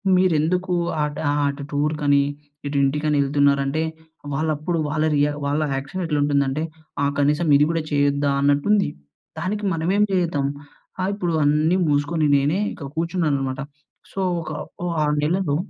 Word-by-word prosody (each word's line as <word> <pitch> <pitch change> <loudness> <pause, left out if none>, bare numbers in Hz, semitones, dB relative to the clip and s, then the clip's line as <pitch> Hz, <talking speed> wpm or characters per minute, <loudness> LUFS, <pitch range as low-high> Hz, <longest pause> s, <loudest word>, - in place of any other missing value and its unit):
మీరెందుకు 180 +1 +2 0.3
అట్ 150 -1 -3
ఆహ్, 145 0 +1
అటు 140 +1 -6
టూర్‌కని 145 -1 +2 0.4
ఇటు 140 0 -2
ఇంటికని 150 +2 +1
ఎళ్తున్నారంటే? 140 +1 +2 0.5
వాళ్ళప్పుడు 155 +3 -1
వాళ్ళ 155 +1 0
రియా 145 +1 +3
వాళ్ళ 145 +2 0
యాక్షన్ 135 +8 -4
ఎట్లా 150 -3 0
ఉంటుందంటే? 140 0 +1 0.4
ఆహ్, 140 - +2
కనీసం 150 +4 +2
ఇది 150 +1 +4
గూడా 165 -1 -1
చేయొద్దా? 145 0 +2
అన్నట్టు 145 +2 +2
ఉంది. 205 -2 +2 0.5
దానికి 205 +5 -2
మనమేం 185 +6 +2
చేద్దాం. 170 -7 +1 0.5
ఆహ్, 185 +1 0
ఇప్పుడు 175 -4 -2
అన్నీ 155 +4 +3
మూసుకొని 150 +2 +1
నేనే 145 +7 +1
ఇక్కడ 140 - -8
కూర్చున్నాను 165 -2 0
అనమాట. 130 0 -3 0.5
సో, - - -5 0.2
ఒక 160 - -6 0.5
ఆహ్, 150 0 +2
నెలలో 165 -1 +1
150 Hz, 140 wpm, -22 LUFS, 145-165 Hz, 0.5 s, ఇది